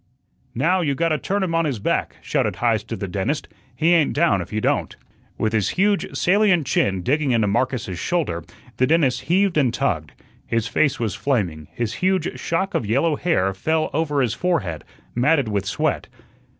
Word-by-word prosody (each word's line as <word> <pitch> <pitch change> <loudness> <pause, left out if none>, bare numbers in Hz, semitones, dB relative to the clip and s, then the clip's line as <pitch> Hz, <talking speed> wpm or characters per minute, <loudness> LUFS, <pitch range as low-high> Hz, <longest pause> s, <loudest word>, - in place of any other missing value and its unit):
"Now, 175 +9 +2
you 145 -5 0
gotta 160 0 +1
turn 200 +5 -1
him 175 -3 -2
on 165 0 +2
his 140 -6 -1
back," 100 - -1
shouted - - 0
Heise - - +1
to - - -5
the 100 - -4
dentist. 100 - -2 0.3
"He 160 +7 +3
ain't 165 -4 +3
down 125 - +2
if 90 - -8
you 110 - -1
don't." - - 0 0.4
With 110 0 0
his 110 -3 +1
huge 200 +1 +1
salient 190 -4 +3
chin 95 -6 +1
digging 140 - +1
into 115 -2 +2
Marcus's 110 -3 -1
shoulder, 145 - -1 0.3
the 130 - +3
dentist 145 -6 +2
heaved 185 -1 +2
and 130 -5 +2
tugged. 95 - -1 0.3
His 115 -1 0
face 145 +5 +1
was 110 -5 -1
flaming, 90 - -1
his 115 -2 -3
huge 185 -2 0
shock 190 +4 -1
of - - 0
yellow 140 +8 +2
hair 95 - +1
fell 155 +11 0
over 150 -2 +1
his 120 -4 +1
forehead, 155 - -1 0.3
matted 140 +2 +2
with 100 -2 -1
sweat. - - -1
140 Hz, 180 wpm, -22 LUFS, 105-165 Hz, 0.4 s, He